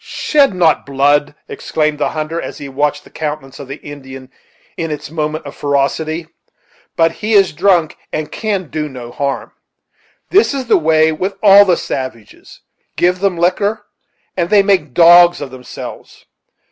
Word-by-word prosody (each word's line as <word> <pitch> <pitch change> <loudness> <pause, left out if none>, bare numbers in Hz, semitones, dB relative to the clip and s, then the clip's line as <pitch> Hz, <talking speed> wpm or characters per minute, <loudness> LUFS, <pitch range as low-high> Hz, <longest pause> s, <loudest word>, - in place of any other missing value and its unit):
"Shed 280 -9 +1
not 165 -4 +2
blood!" 145 +1 +1
exclaimed 155 -1 -2
the - - 0
hunter, 155 +2 -4
as - - -7
he 140 - -8
watched 145 +2 -1
the - - -18
countenance 150 -3 -5
of 140 - -9
the 135 - -6
Indian 135 -2 -10 0.4
in 165 -1 -3
its 150 -1 -6
moment 155 -1 -3
of 140 - -9
ferocity; 155 +3 -1 0.7
"but 165 0 +3
he 215 +6 -3
is 195 -5 +4
drunk 175 -1 +2 0.2
and 155 -1 -4
can 200 -7 -3
do 155 -1 -3
no 125 -3 -9
harm. 140 +1 -3 0.8
This 385 -6 +3
is 265 -2 -3
the 230 - +4
way 160 0 +3
with 185 +5 -3
all 200 0 +8
the 180 -3 +2
savages; 130 -5 -7 0.3
give 180 +1 +1
them 195 -2 0
liquor, 200 +5 0 0.5
and 175 -2 -1
they 205 -2 +5
make 180 -10 0
dogs 175 +1 +7
of 140 -3 -7
themselves. 125 -1 -10
155 Hz, 160 wpm, -16 LUFS, 145-185 Hz, 0.8 s, all